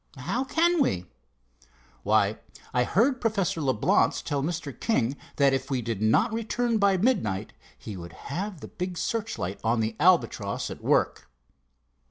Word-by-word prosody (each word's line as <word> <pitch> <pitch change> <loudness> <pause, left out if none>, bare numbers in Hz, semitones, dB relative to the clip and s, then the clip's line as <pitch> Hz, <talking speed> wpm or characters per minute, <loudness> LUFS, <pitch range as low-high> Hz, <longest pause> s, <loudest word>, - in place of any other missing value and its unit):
"How 190 - -1
can 330 +4 +2
we?" 90 - +1 1.0
"Why, - - +2 0.3
I 125 0 +2
heard 245 - +2
Professor 200 -8 0
Leblance 130 -7 +2
tell 145 -2 -1
Mr. 155 -2 -3
King 135 - +1 0.2
that 140 -1 +4
if 135 +1 -2
we 130 -3 -1
did 110 -3 -3
not 110 - +3
return 230 0 0
by 200 -2 +4
midnight, 175 - 0 0.2
he 105 - -8
would 85 -2 -9 0.2
have 185 -1 -4
the - - -7
big 180 -1 -5
searchlight 205 - -3
on 115 +1 +2
the 110 0 -1
Albatross 175 +2 +2
at - - -8
work." - - +1
160 Hz, 150 wpm, -27 LUFS, -, 1.0 s, that